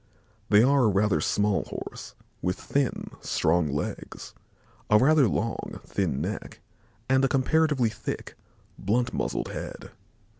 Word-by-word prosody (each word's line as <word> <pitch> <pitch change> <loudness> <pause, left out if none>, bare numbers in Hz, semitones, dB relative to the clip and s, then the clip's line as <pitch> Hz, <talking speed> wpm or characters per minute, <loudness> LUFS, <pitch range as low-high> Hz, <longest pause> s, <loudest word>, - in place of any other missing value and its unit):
They 105 +1 +6
are 135 0 +4
a - - +5
rather 100 -5 +2
small 105 +3 +1
Horse - - -8 0.3
with 90 0 0
thin, 140 -2 -1
strong 85 0 +1
legs, 75 +1 -5 0.6
a 105 - +6
rather 140 +2 +5
long, 115 +2 -3
thin 85 -9 -1
neck 95 +7 -5 0.5
and 130 +1 +3
a - - +5
comparatively 140 -2 +2
thick, 105 - -6 0.4
blunt 120 +5 0
muzzled - - -2
head. - - -7
110 Hz, 125 wpm, -27 LUFS, 95-130 Hz, 0.6 s, They